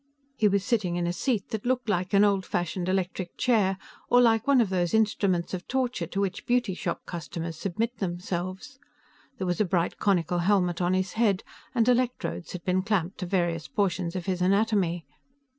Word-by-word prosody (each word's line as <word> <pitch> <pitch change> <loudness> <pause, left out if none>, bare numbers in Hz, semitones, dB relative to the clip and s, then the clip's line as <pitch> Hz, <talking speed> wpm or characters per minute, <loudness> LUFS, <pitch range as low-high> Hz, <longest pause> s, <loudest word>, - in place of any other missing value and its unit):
He 215 - +3
was 200 -1 +1
sitting 205 -8 0
in 175 0 -1
a 175 - -1
seat 220 0 -1
that 220 -2 -4
looked 250 -1 0
like 185 -3 0
an 200 - +6
old 200 -2 +3
fashioned 175 +1 -2
electric 185 -1 -2
chair, 205 -6 +2 0.3
or 245 - +6
like 230 0 +4
one 280 -2 +5
of 220 -5 +2
those 180 +1 +1
instruments 200 -5 +1
of 185 -1 -5
torture 250 -9 -1
to 195 - -3
which 195 -1 -3
beauty 245 -5 +2
shop 180 -1 -4
customers 165 0 -5
submit 225 +6 -2
themselves. 185 +7 -4 0.6
There 190 - -3
was 180 +3 0
a - - +6
bright 175 -3 0
conical 175 -3 +1
helmet 180 -2 +2
on 180 +1 +2
his 185 0 -1
head, 215 -4 +2 0.3
and 230 -1 +3
electrodes 250 -7 0
had 180 -2 -6
been 185 0 +1
clamped 195 -3 -1
to 180 - -3
various 175 -3 0
portions 180 -3 -1
of 180 -2 -3
his 185 -2 -1
anatomy. 190 -3 +2
190 Hz, 190 wpm, -27 LUFS, 175-220 Hz, 0.6 s, an